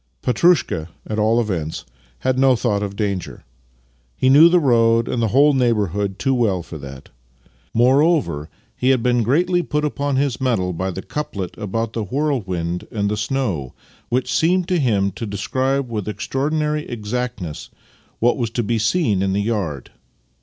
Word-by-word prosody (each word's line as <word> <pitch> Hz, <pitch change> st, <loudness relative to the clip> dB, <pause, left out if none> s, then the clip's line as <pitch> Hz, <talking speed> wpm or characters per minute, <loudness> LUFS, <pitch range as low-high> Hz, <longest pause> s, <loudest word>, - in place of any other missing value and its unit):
Petrushka, 125 Hz, -, +2 dB, 0.2 s
at 110 Hz, 0 st, -3 dB
all 110 Hz, +2 st, +3 dB
events, 85 Hz, -9 st, -3 dB, 0.4 s
had 130 Hz, 0 st, 0 dB
no 135 Hz, -1 st, +5 dB
thought 110 Hz, -4 st, 0 dB
of 100 Hz, -1 st, -4 dB
danger. 100 Hz, -3 st, -3 dB, 0.8 s
Pie 130 Hz, -, +3 dB
knew 150 Hz, +5 st, +8 dB
the 180 Hz, +1 st, +4 dB
road 115 Hz, -5 st, +3 dB
and 120 Hz, -, -1 dB
the 115 Hz, -, +2 dB
whole 140 Hz, +7 st, +4 dB
neighbourhood 105 Hz, -, 0 dB
too 135 Hz, +3 st, +1 dB
well 105 Hz, -8 st, +1 dB
for 80 Hz, -2 st, -9 dB
that. 70 Hz, -1 st, -10 dB, 0.7 s
Moreover, 130 Hz, -, +2 dB, 0.3 s
he 130 Hz, -, 0 dB
had 130 Hz, -3 st, +3 dB
been 120 Hz, -1 st, +2 dB
greatly 175 Hz, -, +2 dB
put 150 Hz, -3 st, -1 dB
upon 145 Hz, -1 st, -1 dB
his 135 Hz, -2 st, 0 dB
mettle 105 Hz, -9 st, 0 dB
by 95 Hz, +3 st, -2 dB
the 95 Hz, +1 st, -6 dB
couplet 100 Hz, -, -5 dB
about 115 Hz, +2 st, -3 dB
the 115 Hz, -, -2 dB
whirlwind 95 Hz, -, -2 dB
and 100 Hz, -2 st, -1 dB
the -, -, 0 dB
snow, 105 Hz, -, -2 dB, 0.3 s
which 125 Hz, +1 st, 0 dB
seemed 175 Hz, +2 st, +2 dB
to 180 Hz, -2 st, +2 dB
him 100 Hz, -8 st, +1 dB
to 110 Hz, +4 st, -6 dB
describe 130 Hz, +6 st, -1 dB
with 105 Hz, -2 st, -3 dB
ex 105 Hz, -1 st, -5 dB
traorchnary 150 Hz, +2 st, -1 dB
exactness 115 Hz, -7 st, -4 dB, 0.5 s
what 120 Hz, +5 st, +2 dB
was 120 Hz, -4 st, -1 dB
to 120 Hz, +1 st, -2 dB
be 115 Hz, +1 st, 0 dB
seen 110 Hz, -, +1 dB
in 95 Hz, 0 st, 0 dB
the 100 Hz, -, +1 dB
yard. 100 Hz, -, -3 dB
115 Hz, 165 wpm, -20 LUFS, 100-135 Hz, 0.8 s, knew